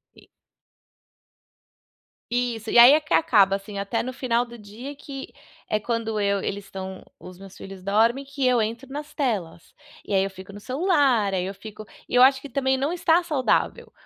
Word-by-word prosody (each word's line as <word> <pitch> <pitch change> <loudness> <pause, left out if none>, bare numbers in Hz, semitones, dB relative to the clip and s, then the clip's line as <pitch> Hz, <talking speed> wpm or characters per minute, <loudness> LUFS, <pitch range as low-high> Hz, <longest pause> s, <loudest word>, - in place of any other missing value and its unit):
E - - -19 2.1
Isso, 240 -2 -2
e - - +3
aí 240 +3 +10
é 305 - +4
que 305 - -8
acaba, 195 -9 +4
assim, 200 +1 -10
até 200 +4 -2
no 255 - -4
final 245 -2 0
do 240 0 -11
dia, 225 +7 -9
que 275 -1 -9 0.4
é 215 - 0
quando 225 -1 -2
eu 200 -1 +1
eles 200 +1 -4
estão 190 -1 -8 0.2
os 185 0 -12
meus 195 -1 -12
filhos 195 -1 -10
dormem, 225 +7 +2
que 275 -1 -2
eu 250 -2 +3
entro 230 +4 -4
nas 295 +2 -7
telas 195 - -3 0.3
e 205 - -3
aí 190 - +4
eu 195 - -2
fico 190 +1 -12
no 205 - -10
celular. 260 - +1
Aí 180 -1 -1
eu 195 - -4
fico 215 +2 -10 0.2
e - - -6
eu 250 - +6
acho 265 +1 +6
que 285 - -9
também 265 +1 0
não 275 +5 -1
está 340 -1 +3
saudável, 295 -7 0
230 Hz, 190 wpm, -24 LUFS, 200-270 Hz, 2.1 s, aí